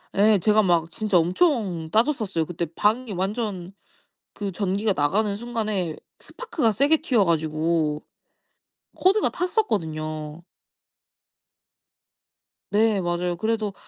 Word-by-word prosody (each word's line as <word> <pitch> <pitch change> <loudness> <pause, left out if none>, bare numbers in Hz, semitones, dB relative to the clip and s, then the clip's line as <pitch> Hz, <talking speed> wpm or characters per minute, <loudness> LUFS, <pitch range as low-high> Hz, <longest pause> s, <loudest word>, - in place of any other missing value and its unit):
예. 210 +1 +5
제가 215 +4 +4
막 170 -4 +1
진짜 210 0 +1
엄청 180 - +1
따졌었어요. 220 - +1
그때 170 +1 -3
방이 220 +3 +1
완전 195 -1 -3 0.6
그 200 -2 -4
전기가 200 +2 0
나가는 200 +8 +1
순간에 215 -7 -3 0.2
스파크가 330 - -2
세게 280 +9 +3
튀어 255 - +2
가지고 155 -1 0 0.9
코드가 390 +3 +3
탔었거든요. 160 - -2 2.3
네 210 -1 +2
맞아요. 175 0 -1
그래도 215 +2 -1
200 Hz, 240 characters per minute, -24 LUFS, 170-225 Hz, 2.3 s, 예